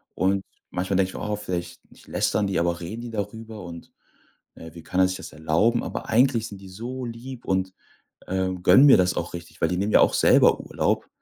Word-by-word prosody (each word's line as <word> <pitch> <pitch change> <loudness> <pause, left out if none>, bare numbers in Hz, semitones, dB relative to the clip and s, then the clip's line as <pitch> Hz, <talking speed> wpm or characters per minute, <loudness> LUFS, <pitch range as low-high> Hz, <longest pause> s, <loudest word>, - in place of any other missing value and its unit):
und 95 +1 +1 0.3
manchmal 95 +2 -1
denke 95 -1 +2
ich - - -10
mir: - - -6
„Oh, 105 - 0
vielleicht 90 -4 -6
nicht - - -19
lästern 105 -2 0
die, 95 -3 0
aber 85 0 0
reden 105 +7 -6
die 120 -1 -7
darüber" 110 0 -6
und, 85 -1 -10 0.6
äh, 80 -1 -11
„Wie 85 - -11
kann 90 +2 -3
er 95 - +5
sich 95 0 -4
das - - -10
erlauben?“ 80 +10 +1
Aber - - -5
eigentlich 115 -1 +3
sind 100 -3 -10
die 95 - -11
so 125 +7 -6
lieb 120 +2 -8
und, 95 -1 -1 0.5
äh, 95 0 0
gönnen 135 +8 +7
mir 140 - +8
das 90 0 +2
auch 85 - -4
richtig, 85 -1 -10
weil 80 - +2
die 90 - -1
nehmen 100 +3 -1
ja - - +7
auch - - +4
selber - - +5
Urlaub. - - -1
95 Hz, 225 wpm, -24 LUFS, 90-115 Hz, 0.6 s, mir